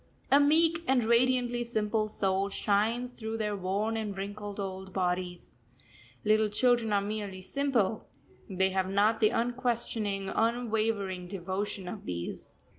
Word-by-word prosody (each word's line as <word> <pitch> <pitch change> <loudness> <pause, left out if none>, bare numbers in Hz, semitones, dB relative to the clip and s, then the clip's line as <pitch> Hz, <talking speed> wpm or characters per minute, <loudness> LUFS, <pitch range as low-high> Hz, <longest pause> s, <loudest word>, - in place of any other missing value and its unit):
A 280 - +7
meek 325 +3 +4
and 260 -2 +3
radiantly 240 +1 +2
simple 215 -2 0
soul 195 -1 0
shines 220 +5 0
through 225 -2 -5
their 210 -2 -1
worn 200 +4 -1
and 210 -3 -3
wrinkled, 205 +1 -6
old 190 -1 -5
bodies. 180 -3 -2 0.7
Little 215 0 +4
children 235 +1 +2
are 200 -1 +3
merely 200 -2 -4
simple, 230 -3 0 0.4
they 190 0 +1
have 190 0 0
not 210 +3 +3
the 215 - +5
unquestioning, 230 -4 -1
unwavering 220 -5 0
devotion 190 +1 -4
of 200 +3 -7
these. 85 -1 -5
210 Hz, 130 wpm, -30 LUFS, 195-235 Hz, 0.7 s, A